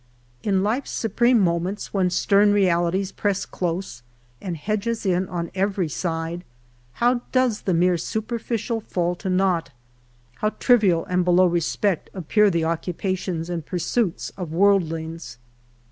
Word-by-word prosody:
In 195 -2 +1
life's 235 +7 -1
supreme 235 +2 +2
moments, 180 +2 -1
when 190 -3 +2
stern 200 +3 +3
realities 185 -1 +1
press 200 -2 -1
close 175 -7 -4 0.4
and 175 -4 -4
hedge 210 +7 -2
us 230 -2 -2
in 185 -1 +1
on 170 -2 -4
every 190 -3 0
side, 165 +6 -3 0.5
how 240 - +2
does 255 -4 +2
the 185 - 0
mere 175 0 +3
superficial 225 +3 -3
fall 175 -4 -1
to 190 - -4
naught! 185 -4 +1 0.7
How 215 - +1
trivial 205 -9 +3
and 180 0 +1
below 180 +1 +4
respect 175 +2 0
appear 205 +4 +3
the 170 -3 0
occupations 175 +1 -2
and 175 -2 -3
pursuits 180 +4 -1
of 180 -5 -5
worldlings 165 -7 0
185 Hz, 135 wpm, -23 LUFS, 170-205 Hz, 0.7 s, below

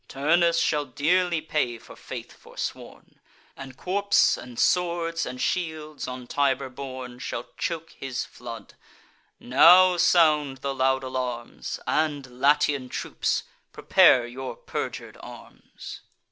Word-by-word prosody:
Turnus 170 +4 +2
shall 150 -3 +1
dearly 170 +5 +1
pay 150 -6 -1
for - - -14
faith - - -8
forsworn; - - -8 0.4
And 135 -1 -10
corps, 200 +2 +2
and 120 -1 -11
swords, 170 0 +1
and 125 0 -7
shields, 155 0 -3
on 125 0 -6
Tiber 135 0 0
borne, 130 -1 -8
Shall 120 -1 -5
choke 165 -1 -4
his 135 -2 -5
flood: 115 -1 -10 0.7
now 180 +8 +6
sound 150 -6 +3
the 140 - 0
loud 130 0 +1
alarms; 125 -2 -4
And, 145 -5 -1
Latian 145 -2 +2
troops, - - -2 0.3
prepare 125 -2 +5
your 130 +2 -7
perjur'd - - -6
arms." - - -11
140 Hz, 120 wpm, -25 LUFS, 130-165 Hz, 0.7 s, now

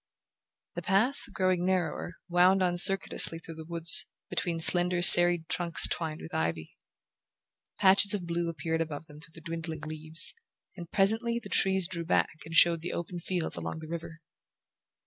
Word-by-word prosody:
The - - -8
path, 220 +8 -2
growing 185 -2 -2
narrower, 180 -2 -4
wound 180 +2 +1
on 175 -1 -2
circuitously 190 -3 +3
through 165 0 -13
the 160 0 -13
woods, 170 0 +1 0.2
between 170 -2 -4
slender 175 +1 +5
serried 175 -2 +8
trunks 170 -2 +2
twined 160 -2 -6
with 80 - -13
ivy. 80 0 -5 1.0
Patches 200 +1 +3
of 185 -4 -8
blue 170 0 -5
appeared 160 0 -5
above 155 -1 -7
them 150 -2 -17
through 165 0 -16
the 165 - -13
dwindling 165 -1 -8
leaves, 155 +1 -1 0.4
and 170 -3 -12
presently 225 +4 0
the 235 - -10
trees 190 -2 +1
drew 170 -2 -7
back 160 -1 -3
and 165 0 -10
showed 170 -1 +3
the 175 - -7
open 175 +1 -8
fields 175 - -6
along 85 - -7
the 160 0 -12
river. 165 0 -10
170 Hz, 165 wpm, -26 LUFS, 160-185 Hz, 1.0 s, serried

